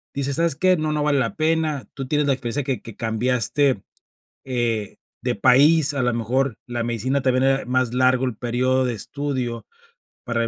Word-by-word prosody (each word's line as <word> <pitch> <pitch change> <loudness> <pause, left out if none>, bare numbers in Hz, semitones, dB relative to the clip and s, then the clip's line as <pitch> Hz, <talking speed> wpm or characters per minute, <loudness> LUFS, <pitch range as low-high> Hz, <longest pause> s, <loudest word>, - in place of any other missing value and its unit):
dices: 140 +1 -1
"Sabes 165 -4 +1
qué, 185 +3 +3
no, 155 -1 -1
no 150 - 0
vale 145 -2 +2
la 115 -3 -1
pena"?, 155 -6 0
tú 135 -1 -6
tienes 150 +1 +1
la 140 - +3
experiencia 130 +2 -3
que 130 -1 -3
que 115 - -11
cambiaste, 125 +2 0 0.6
eh, 120 -5 -2 0.3
de - - 0
país, 150 +3 +5
a 140 - -1
la 125 -1 +1
mejor, 120 +1 -1
la 120 -1 -3
medicina 120 +4 -1
también 130 0 +2
era 135 0 +2
más 125 -1 0
largo 130 0 +3
el 125 -4 -3
período 130 +2 0
de 125 - -1
estudio, 125 -1 -3 0.6
para, 115 -1 -1
130 Hz, 185 wpm, -22 LUFS, 120-140 Hz, 0.6 s, país